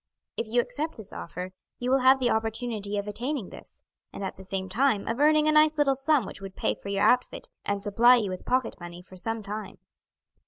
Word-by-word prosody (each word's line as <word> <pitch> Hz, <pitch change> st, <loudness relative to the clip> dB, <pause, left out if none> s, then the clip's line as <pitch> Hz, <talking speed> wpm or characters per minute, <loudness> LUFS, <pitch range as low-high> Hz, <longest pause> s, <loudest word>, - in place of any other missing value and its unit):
If 230 Hz, -, -2 dB
you 240 Hz, +2 st, +3 dB
accept 290 Hz, +7 st, -4 dB
this 210 Hz, -2 st, -8 dB
offer 180 Hz, +2 st, -6 dB, 0.3 s
you 245 Hz, +1 st, -2 dB
will 270 Hz, -, +4 dB
have 260 Hz, +1 st, +5 dB
the 245 Hz, -2 st, +2 dB
opportunity 220 Hz, -2 st, -2 dB
of 200 Hz, 0 st, -3 dB
attaining 240 Hz, +1 st, -3 dB
this, -, -, -14 dB, 0.3 s
and -, -, -7 dB
at 190 Hz, -, -4 dB
the 190 Hz, -, -12 dB
same 190 Hz, 0 st, -3 dB
time 220 Hz, +1 st, +1 dB
of 230 Hz, +3 st, -2 dB
earning 305 Hz, +1 st, +4 dB
a -, -, +5 dB
nice 305 Hz, 0 st, +5 dB
little 285 Hz, -2 st, +3 dB
sum 270 Hz, -2 st, +2 dB
which 195 Hz, -, -8 dB
would 195 Hz, -1 st, -8 dB
pay -, -, 0 dB
for 200 Hz, -, -9 dB
your 200 Hz, 0 st, 0 dB
outfit 250 Hz, -, +2 dB, 0.2 s
and 200 Hz, -1 st, -2 dB
supply 230 Hz, +4 st, +6 dB
you 210 Hz, -6 st, 0 dB
with 185 Hz, -, -6 dB
pocket 255 Hz, -2 st, 0 dB
money 175 Hz, 0 st, -9 dB
for 185 Hz, -, -15 dB
some 225 Hz, +4 st, -3 dB
time." 210 Hz, 0 st, -6 dB
225 Hz, 225 wpm, -27 LUFS, 200-260 Hz, 0.3 s, supply